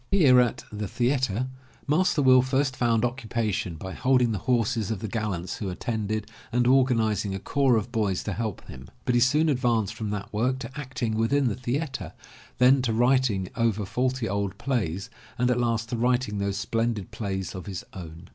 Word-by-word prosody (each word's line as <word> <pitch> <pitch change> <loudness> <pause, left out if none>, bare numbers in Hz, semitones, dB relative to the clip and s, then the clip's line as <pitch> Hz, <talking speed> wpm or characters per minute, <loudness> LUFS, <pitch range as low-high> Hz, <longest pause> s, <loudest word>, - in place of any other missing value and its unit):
Here 145 -10 +6
at 120 -2 +1
The 105 0 -4
Theatre 125 0 0 0.4
Master 150 0 +2
Will 130 -1 +7
first 130 +1 0
found 120 -2 +2
occupation 115 -7 -2
by 95 +4 -7
holding 125 -2 +2
the 105 - -2
horses 115 -3 +1
of 110 - -1
the 110 - -5
gallants 100 -5 -3
who 100 - -3
attended, 110 +2 -2 0.3
and 120 +1 +2
organizing 115 -6 +2
a - - -4
corps 135 +4 +2
of 110 +3 -3
boys 105 -6 0
to 105 - -3
help 110 -2 -4
him. 65 0 -10 0.2
But 125 - +1
he 120 - +3
soon 150 +6 +4
advanced 120 -7 +1
from 110 -2 -4
that 105 0 -5
work 125 +5 +1
to 120 -2 -7
acting 125 -5 -3
within 120 +5 +2
the 100 - -2
theatre, 130 +4 -3 0.4
then 130 +2 +5
to 120 -3 0
writing 120 -5 +2
over 110 -3 +1
faulty 125 +3 -1
old 100 -1 -2
plays, 115 -5 -2 0.3
and 125 +1 +2
at 125 - +1
last 115 -1 0
to 120 - -2
writing 120 -3 +1
those 100 0 -1
splendid 110 0 -1
plays 95 -3 -4
of 95 +1 -8
his 95 -3 -5
own. 85 -2 -9
115 Hz, 185 wpm, -26 LUFS, 105-125 Hz, 0.4 s, Will